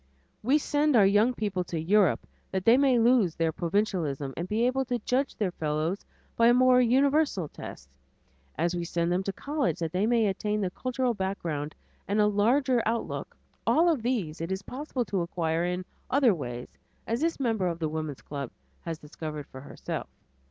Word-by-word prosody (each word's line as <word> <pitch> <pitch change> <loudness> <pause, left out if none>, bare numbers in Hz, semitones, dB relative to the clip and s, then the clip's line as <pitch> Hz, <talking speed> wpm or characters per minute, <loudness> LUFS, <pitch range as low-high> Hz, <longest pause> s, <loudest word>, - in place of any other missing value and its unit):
We 265 +7 +3
send 295 -1 +1
our 210 -4 +7
young 210 +5 +4
people 200 -5 -1
to 170 - -3
Europe 190 +2 +3 0.2
that 190 -1 -3
they 230 - +7
may 265 -2 +4
lose 230 -7 +4
their 165 -1 +1
provincialism 165 -7 -1
and 175 +2 -4
be 225 +3 +1
able 260 +2 +1
to 245 -1 -1
judge 255 +4 -1
their 200 -4 -1
fellows 155 +4 -2 0.3
by 230 - +5
a 240 - +6
more 255 0 +6
universal 270 - +2
test, 65 - -9 0.7
as 175 +1 0
we 175 - -2
send 170 0 -1
them 180 +1 +1
to 195 - -2
college 285 +6 -1
that 165 -2 -3
they 190 +4 +1
may 230 -2 +3
attain 210 +2 -1
the 190 -3 -1
cultural 255 +3 -1
background 170 -7 -3 0.3
and 205 +2 +1
a 210 - +5
larger 240 +5 +3
outlook; 230 +1 -3 0.3
all 335 +3 +4
of 310 -8 +1
these 215 -11 -2
it 165 +3 -3
is 190 +1 -3
possible 260 -2 -4
to 195 -4 -1
acquire 170 -1 -1
in 180 +1 -2 0.2
other 260 -5 +4
ways, 125 -6 -7 0.3
as 230 +4 -1
this 330 -1 0
member 225 -8 +1
of 170 -2 -2
the 160 -2 -1
woman's 155 -3 -4
club 140 -4 -5 0.3
had 165 -2 -5
discovered 150 -1 -7
for 130 - -11
herself. 140 - -6
200 Hz, 185 wpm, -28 LUFS, 165-245 Hz, 0.7 s, our